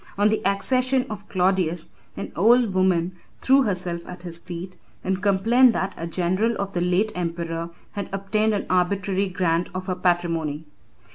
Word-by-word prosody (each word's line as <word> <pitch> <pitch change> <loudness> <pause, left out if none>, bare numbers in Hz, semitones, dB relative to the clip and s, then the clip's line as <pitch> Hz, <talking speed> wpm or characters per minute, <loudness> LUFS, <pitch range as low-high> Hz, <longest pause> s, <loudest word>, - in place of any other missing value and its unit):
On 205 +1 +4
the 220 - 0
accession 255 +6 +1
of 205 -1 -8
Claudius, 180 -3 +1 0.3
an - - -5
old 230 +3 +4
woman 185 -2 +2 0.3
threw 270 +1 +5
herself 180 -6 -2
at 180 -1 -9
his 170 -1 -4
feet, 180 +1 -7 0.3
and 190 0 -1
complained 225 +6 +4
that 190 -1 -2
a 165 - -5
general 185 +7 0
of 200 0 -3
the 175 - -1
late 180 +5 +2
emperor 170 -1 -3 0.2
had 200 -2 -5
obtained 210 +2 0
an 200 - -2
arbitrary 195 +2 +1
grant 180 -2 0
of 185 0 -3
her 185 - -1
patrimony. 165 -4 0
185 Hz, 160 wpm, -24 LUFS, 175-205 Hz, 0.3 s, threw